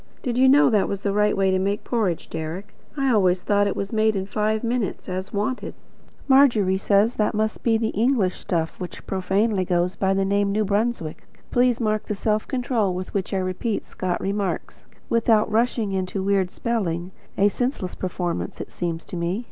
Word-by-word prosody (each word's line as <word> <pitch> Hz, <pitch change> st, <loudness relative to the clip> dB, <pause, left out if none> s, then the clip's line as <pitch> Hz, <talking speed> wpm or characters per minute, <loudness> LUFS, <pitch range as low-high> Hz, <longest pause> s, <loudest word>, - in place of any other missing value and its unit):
Did 245 Hz, -3 st, -1 dB
you 260 Hz, +1 st, +5 dB
know 285 Hz, 0 st, +6 dB
that 210 Hz, -3 st, +3 dB
was 200 Hz, -1 st, -3 dB
the 200 Hz, -, +1 dB
right 210 Hz, 0 st, +2 dB
way 195 Hz, -1 st, +3 dB
to 185 Hz, -, +2 dB
make 200 Hz, +2 st, -1 dB
porridge, 210 Hz, -9 st, -1 dB
Deryck? 175 Hz, +6 st, -6 dB, 0.2 s
I 270 Hz, -2 st, +2 dB
always 185 Hz, -4 st, +3 dB
thought 205 Hz, +1 st, +2 dB
it 200 Hz, -, -1 dB
was 200 Hz, +2 st, -4 dB
made 220 Hz, 0 st, +2 dB
in 190 Hz, -1 st, -2 dB
five 215 Hz, +2 st, -1 dB
minutes, 235 Hz, -3 st, -2 dB
as 185 Hz, 0 st, -4 dB
wanted. 210 Hz, +6 st, -2 dB, 0.5 s
Margery 235 Hz, -9 st, +4 dB
says 205 Hz, +4 st, +3 dB
that 210 Hz, -2 st, 0 dB
must 215 Hz, +1 st, -1 dB
be 225 Hz, -2 st, +3 dB
the 220 Hz, 0 st, 0 dB
English 220 Hz, -4 st, +1 dB
stuff 165 Hz, -2 st, -2 dB
which 180 Hz, -2 st, -7 dB
profanely 195 Hz, +2 st, +1 dB
goes 180 Hz, 0 st, 0 dB
by 195 Hz, 0 st, +1 dB
the 195 Hz, 0 st, +1 dB
name. 200 Hz, 0 st, +1 dB
(N.B. 210 Hz, -5 st, 0 dB, 0.4 s
Please 245 Hz, -1 st, +3 dB
mark 215 Hz, -2 st, -1 dB
the 210 Hz, -, -2 dB
self 215 Hz, +1 st, 0 dB
control 245 Hz, -7 st, 0 dB
with 185 Hz, 0 st, -6 dB
which 195 Hz, -2 st, -2 dB
I 195 Hz, -, 0 dB
repeat 185 Hz, +4 st, -2 dB
Scotch 180 Hz, -1 st, -3 dB
remarks, 200 Hz, 0 st, -3 dB, 0.2 s
without 225 Hz, -2 st, +2 dB
rushing 225 Hz, -2 st, +1 dB
into 190 Hz, 0 st, -2 dB
weird 195 Hz, -2 st, +2 dB
spelling; 185 Hz, -7 st, -2 dB, 0.3 s
a 200 Hz, -, +5 dB
senseless 225 Hz, -4 st, -2 dB
performance, 175 Hz, -2 st, -3 dB
it -, -, -7 dB
seems 170 Hz, -2 st, -4 dB
to -, -, -8 dB
me. 175 Hz, +4 st, -1 dB
200 Hz, 190 wpm, -23 LUFS, 185-225 Hz, 0.5 s, know